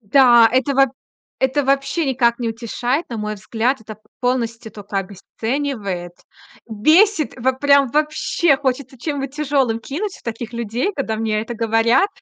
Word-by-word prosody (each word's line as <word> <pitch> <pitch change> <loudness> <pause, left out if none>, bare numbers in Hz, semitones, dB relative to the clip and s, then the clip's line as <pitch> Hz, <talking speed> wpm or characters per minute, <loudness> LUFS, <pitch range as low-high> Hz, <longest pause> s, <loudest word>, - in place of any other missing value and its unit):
Да, 240 +1 +6
это 260 +2 +1
во 270 0 +5 0.5
это 265 +2 +1
вообще 275 +4 0
никак 240 -3 +2
не 240 -2 -2
утешает. 240 +6 -2
На 230 - -4
мой 210 0 -3
взгляд, 230 +5 -2
это 215 -1 -10 0.2
полностью 235 -2 -2
тока 205 -1 -7
обесценивает. 200 -1 -4 0.5
Бесит, 310 - +3
вот 260 +2 0
прям 280 -1 +4
вообще 305 +1 +1
хочется 260 -1 -3
чем-нибудь 275 0 -4
тяжёлым 275 -6 +1
кинуть 370 - -5
в - - -20
таких 230 0 -6
людей, 235 - -2
когда 225 -6 -2
мне 215 -1 -1
это 225 - -6
говорят. 230 - +2
250 Hz, 145 wpm, -20 LUFS, 225-275 Hz, 0.5 s, Да